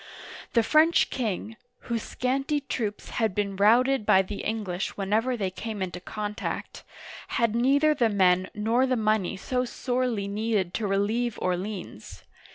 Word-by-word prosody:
The 230 - +4
French 310 +7 +4
king, 225 -2 -3 0.2
whose 235 -2 -3
scanty 270 +6 -1
troops 230 -6 -4
had 220 -4 +1
been 200 -1 -1
routed 235 +6 +4
by 190 -2 +5
the 200 +2 -6
English 205 -4 -3
whenever 220 +6 0
they 195 -4 -2
came 215 +2 -6
into 180 -1 -5
contact, 210 +3 -5 0.5
had 230 -2 +2
neither 280 +6 +4
the 240 -6 +2
men 185 -2 +3
nor 230 +5 +2
the 255 -1 +1
money 215 -4 +1
so 250 +6 -1
sorely 245 -4 -2
needed 205 -3 -1
to 215 - -1
relieve 210 +4 0
Orleans. 185 - -4
220 Hz, 145 wpm, -26 LUFS, 200-245 Hz, 0.5 s, by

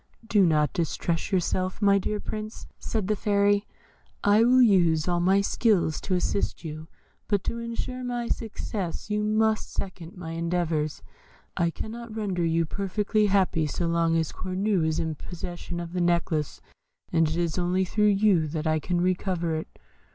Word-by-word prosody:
"Do 210 -3 +4
not 150 -2 +2
distress 165 0 -1
yourself, 185 0 0
my 200 -1 +4
dear 210 +2 -2
Prince," 215 +1 -6
said 215 -5 -2
the 215 - +1
Fairy, 205 -1 +2 0.6
"I 205 +2 +5
will 250 +2 +5
use 170 -8 +4
all 175 -1 +1
my 190 +3 +4
skill 200 -4 +2
to 185 +4 -2
assist 180 +2 -1
you; 155 0 -7 0.4
but 205 -2 +1
to 235 - -3
ensure 235 +2 -4
my 240 -1 -2
success 210 -4 -4
you 210 0 +1
must 215 +1 +1
second 185 -3 -6
my 165 -2 -6
endeavours. 165 -2 -1 0.5
I 170 - +2
cannot 225 +5 -7
render 195 -5 -1
you 165 0 +2
perfectly 205 +4 0
happy 190 -5 +2
so 170 +4 -2
long 165 0 +2
as 160 -1 0
Cornue 185 -2 0
is 160 0 0
in 160 -2 -1
possession 175 +2 -7
of 170 0 -6
the 180 - 0
necklace, 170 -3 0 0.5
and 165 -2 +3
it 160 - -2
is 170 0 0
only 180 +2 +1
through 210 +3 +2
you 195 -5 +3
that 155 +1 -4
I 155 0 +2
can 175 +2 -1
recover 180 -2 0
it. 160 0 -5
185 Hz, 165 wpm, -26 LUFS, 165-210 Hz, 0.6 s, I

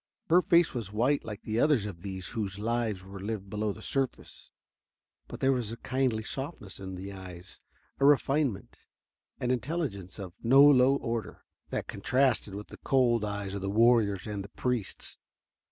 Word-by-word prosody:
Her 180 +2 +7
face 170 -1 +4
was 115 -6 -4
white 125 +7 +1
like 105 -2 -7
the 110 +1 -1
others 145 -8 +3
of 90 -5 -7
these 95 -2 -5
whose 100 -3 -3
lives 110 -3 -1
were 95 +1 -9
lived 100 -1 -5
below 105 0 -1
the - - -9
surface, 135 -2 -3 0.8
but - - -9
there 135 - +4
was 120 -5 -1
a 115 - -6
kindly 125 -3 -1
softness 135 - -4
in 95 -1 -6
the 95 +2 -7
eyes, 90 -1 -11 0.4
a 135 - +3
refinement 140 -6 +2 0.6
and 125 - 0
intelligence 125 - -3
of 95 -4 -7
no 135 +4 +7
low 135 -2 +6
order, 115 -4 -4 0.2
that - - -3
contrasted 125 -6 +1
with 105 +1 -8
the - - -10
cold 120 -4 +2
eyes 105 -2 -3
of 100 - -4
the 95 - -2
warriors 110 -3 +3
and 105 -2 -4
the 100 - -11
priests. 125 -4 -3
110 Hz, 170 wpm, -29 LUFS, 100-130 Hz, 0.8 s, Her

